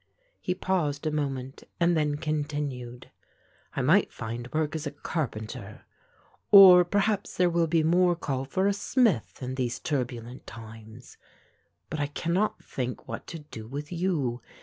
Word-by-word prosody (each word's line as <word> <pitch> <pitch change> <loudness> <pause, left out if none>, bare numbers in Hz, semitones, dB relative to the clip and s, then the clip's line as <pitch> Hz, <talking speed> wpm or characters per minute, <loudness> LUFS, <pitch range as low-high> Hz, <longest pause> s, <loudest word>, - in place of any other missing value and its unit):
He 180 - -2
paused 160 -7 -1
a 155 - +1
moment 135 -3 -3 0.2
and 170 0 +3
then 150 -2 +1
continued; 145 -5 -4 0.6
"I - - 0
might - - +4
find 120 +2 -6
work 155 0 -1
as 155 -1 -3
a - - -4
carpenter, 135 -7 -5 0.6
or 185 -3 +10
perhaps 205 +3 0
there 180 -1 +3
will 170 -1 +2
be 160 0 +2
more 175 +2 +4
call 135 -5 -3
for 185 +8 0
a 200 - +3
smith 200 - +1
in 130 +1 -3
these 125 -2 -2
turbulent 125 -3 -4
times. 110 +1 -11 0.7
But 155 - -3
I 145 - 0
cannot 175 +8 -1
think 125 -1 -5
what - - -6
to 165 - -6
do 130 -8 -10
with 145 +5 -6
you. 165 -9 -1
150 Hz, 150 wpm, -27 LUFS, 125-175 Hz, 0.7 s, or